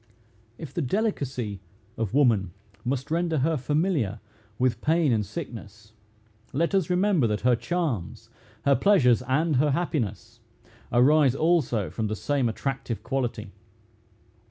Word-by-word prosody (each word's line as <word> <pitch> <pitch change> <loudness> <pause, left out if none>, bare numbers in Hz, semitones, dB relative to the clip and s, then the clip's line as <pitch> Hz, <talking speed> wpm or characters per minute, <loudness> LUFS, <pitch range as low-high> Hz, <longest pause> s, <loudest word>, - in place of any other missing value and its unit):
If 155 -5 -9
the 170 - -1
delicacy 130 - -2 0.3
of 110 -3 -2
woman 110 -11 +3 0.3
must 135 +3 -3
render 165 -1 0
her 155 +4 +1
familiar 145 - 0 0.4
with 125 -3 0
pain 160 -2 +2
and 110 -2 +1
sickness, 105 - -9 0.6
let 165 +7 0
us 190 -4 +1
remember 180 - +2
that 105 -1 -2
her 125 -1 +4
charms, 140 - -3 0.3
her 140 -1 +5
pleasures, 135 - +4
and 140 +4 +1
her 150 +3 +3
happiness, 120 - -2 0.5
arise 135 +2 +4
also 145 - +1
from 110 -2 -2
the 110 - -2
same 135 +1 0
attractive 125 -1 -4
quality. 120 -6 -3
135 Hz, 130 wpm, -26 LUFS, 115-160 Hz, 0.6 s, her